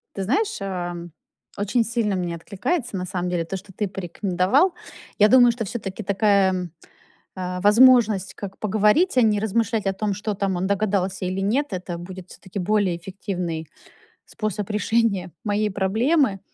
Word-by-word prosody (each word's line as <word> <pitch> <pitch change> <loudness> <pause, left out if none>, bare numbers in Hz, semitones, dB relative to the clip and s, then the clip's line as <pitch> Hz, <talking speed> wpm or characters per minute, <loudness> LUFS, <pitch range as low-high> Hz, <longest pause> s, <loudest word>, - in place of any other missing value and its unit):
Ты 195 - -2
знаешь, 405 - 0
ам, 175 -3 -4 0.5
очень 210 +4 +1
сильно 225 -4 0
мне 175 -2 -2
откликается 210 - -3
на 180 - -3
самом 180 -1 -3
деле 170 -2 -1
то, 195 - -5
что 195 +1 -13
ты 205 +1 -2
порекомендовал. 195 - +1 0.4
Я 210 - +6
думаю, 245 0 +7
что 230 -1 -4
всё-таки 200 -1 -5
такая, 200 -1 +3
м, 180 -3 -4 0.6
а, 180 0 -4
возможность, 215 -3 +5
как 195 -1 -8
поговорить, 215 - +2
а 250 - +6
не 215 -2 +3
размышлять 220 0 0
о 195 - +1
том, 205 +1 -2
что 210 +2 -3
там 195 -1 -1
он 180 +2 -1
догадался 195 -2 0
или 185 +1 -2
нет. 245 +9 +1
Это 180 -1 -4
будет 185 +1 -9
всё-таки 195 +1 -8
более 195 -2 +1
эффективный 175 -3 -5 0.6
способ 210 -2 -4
решения 210 -3 0
моей 210 -1 0
проблемы. 215 - +1
200 Hz, 160 wpm, -23 LUFS, 185-220 Hz, 0.6 s, думаю